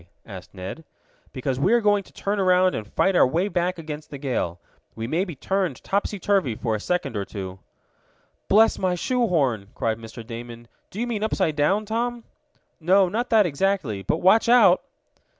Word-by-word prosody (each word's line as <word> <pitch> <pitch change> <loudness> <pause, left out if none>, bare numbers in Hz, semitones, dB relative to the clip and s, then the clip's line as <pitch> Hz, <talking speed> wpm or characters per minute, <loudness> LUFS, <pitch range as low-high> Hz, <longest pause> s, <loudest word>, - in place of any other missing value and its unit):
asked 95 -4 -10
Ned. 95 - -7 0.5
"Because 130 -1 -3
we 175 - +3
are 240 - +5
going 205 -2 +3
to - - -18
turn 200 +1 -2
around 185 -1 +3
and 105 -1 -6
fight 195 -1 +2
our - - +6
way 170 +9 0
back 180 -2 -1
against 155 -2 -7
the 145 - -7
gale. 125 - -2 0.4
We 115 - -4
may 165 +10 0
be 175 -5 -7
turned 185 -1 -2
topsy 205 +1 -1
turvy 190 - +1
for 115 0 -2
a 110 - -1
second 180 -1 -2
or 100 - -1
two." 95 -2 -7 0.9
"Bless 220 +3 +4
my 185 -1 +1
shoe 245 +6 0
horn!" 130 - 0
cried 110 0 -1
Mr. 115 0 -10
Damon. 120 0 -9 0.2
"Do 200 - -8
you 240 - 0
mean 225 -3 -3
upside 190 -7 0
down, 190 +9 +1
Tom?" 235 +2 -2 0.6
"No, 185 +3 +4
not 235 +6 -2
that 220 -3 +5
exactly. 150 - -1
But - - -1
watch 220 +5 +5
out!" 225 -7 +6
175 Hz, 185 wpm, -24 LUFS, 120-200 Hz, 0.9 s, our